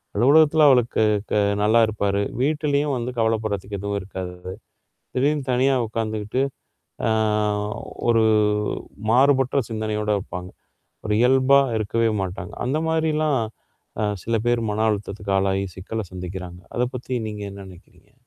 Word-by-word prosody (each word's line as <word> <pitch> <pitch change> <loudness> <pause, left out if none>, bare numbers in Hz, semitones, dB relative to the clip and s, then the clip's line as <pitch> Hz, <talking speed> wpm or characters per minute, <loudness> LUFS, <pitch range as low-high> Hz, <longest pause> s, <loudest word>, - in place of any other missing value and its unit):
அலுவலகத்தில 150 +6 +5
அவருக்கு 120 -3 +3 0.3
க - - +1 0.3
நல்லா 110 +2 +4
இருப்பாரு. 100 -2 0 0.2
வீட்லயும் 145 -1 +1
வந்து 120 +1 -3
கவலப்படுறதுக்கு 110 -3 -1
எதுவும் 100 +1 -2
இருக்காது. 95 -1 -6 0.8
திடீர்ன்னு 140 0 +1
தனியா 130 +2 +3
உட்காந்துக்கிட்டு, 110 +2 -2 0.7
அ - - +2 1.0
ஒரு 115 -1 +4 0.9
மாறுபட்ட 135 +1 +4
சிந்தனையோட 110 -1 -2
இருப்பாங்க. 90 0 -7 0.6
ஒரு 105 - +1
இயல்பா 130 +2 +5 0.2
இருக்கவே 115 +2 +1
மாட்டாங்க. 95 +1 -5
அந்த 140 +4 0
மாரிலாம், 155 -4 +1 0.6
அ - - +1 0.2
சில 115 0 0
பேர் 120 -1 +2
மன 110 +1 0
அழுத்தத்துக்கு 100 -1 -3
ஆளாகி, 95 0 +1
சிக்கல 110 +4 -4
சந்திக்கிறாங்க. 90 0 -7
அத 125 - +2
பத்தி 125 0 -3
நீங்க 105 -1 -6
என்ன 100 0 -10
நெனைக்கிறீங்க? 90 -1 -17
110 Hz, 120 wpm, -23 LUFS, 100-130 Hz, 1.0 s, அலுவலகத்தில